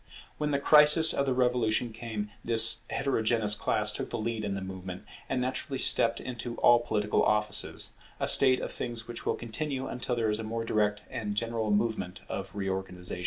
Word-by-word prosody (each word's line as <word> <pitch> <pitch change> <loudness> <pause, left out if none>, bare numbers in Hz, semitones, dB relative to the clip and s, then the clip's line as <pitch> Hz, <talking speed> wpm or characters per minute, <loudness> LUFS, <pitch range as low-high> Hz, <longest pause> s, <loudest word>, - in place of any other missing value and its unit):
When 150 0 -1
the 140 - 0
crisis 150 +3 +6
of 140 - -1
the 130 - +1
Revolution 125 -2 0
came, 110 -3 -6
this 115 0 +4
heterogeneous 115 -5 +2
class 105 0 0
took - - -5
the - - -4
lead 115 0 -4
in 100 -1 -3
the 95 - -5
movement, 95 -1 -8 0.3
and 130 - -1
naturally 130 +1 -4
stepped - - +4
into 120 -1 -6
all 120 0 +4
political 105 -3 -1
offices; 105 0 0 0.3
a - - -1
state 130 -2 +6
of - - -5
things 115 -1 -4
which 120 -1 -8
will - - 0
continue 130 +3 -4
until 125 -1 -3
there 115 -2 -1
is 105 - +1
a - - -4
more 115 +1 -4
direct 105 -1 -1
and 110 -5 -4
general 115 0 -2
movement 105 -4 -2
of - - -7
reorganization. 95 -2 -4
115 Hz, 185 wpm, -28 LUFS, 105-125 Hz, 0.3 s, crisis